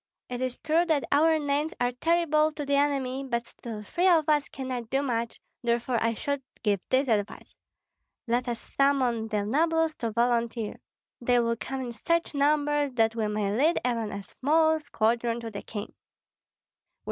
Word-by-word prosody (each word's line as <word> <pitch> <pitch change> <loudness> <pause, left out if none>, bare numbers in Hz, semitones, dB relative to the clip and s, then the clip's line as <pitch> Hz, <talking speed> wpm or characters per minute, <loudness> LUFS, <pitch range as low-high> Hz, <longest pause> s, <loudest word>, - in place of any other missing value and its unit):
It 250 0 -4
is 255 -1 -2
true 320 +2 +3
that 315 -5 +1
our 315 +3 +4
names 295 +1 -1
are 245 0 +1
terrible 310 +2 +2
to 295 -1 -5
the 280 - -1
enemy, 275 -2 +1
but 235 -3 -2
still 220 -3 -8
three 350 - +1
of 330 -4 +4
us 300 -1 +2
cannot 255 -4 -5
do 270 +2 +1
much, 235 -3 -2 0.2
therefore 240 0 0
I 230 0 +1
should 280 +4 -2 0.2
give 205 -3 +2
this 265 +2 +2
advice: 210 -3 -2 0.7
Let 245 +1 0
us 235 -1 -2
summon 255 -5 +1
the 210 -2 -1
nobles 320 +6 +2
to 230 - -2
volunteer; 235 -1 0 0.4
they 245 0 +3
will 230 -1 +1
come 265 +3 -5
in 245 -2 -5
such 335 +8 0
numbers 290 -1 +2
that 225 -2 +2
we 220 -2 0
may 210 -1 -1
lead 310 +8 +3
even 230 -4 -1
a 200 0 -5
small 315 - +2
squadron 235 -4 0
to 225 -1 -6
the 200 - -6
king. 205 -2 -7
255 Hz, 170 wpm, -27 LUFS, 230-295 Hz, 0.7 s, our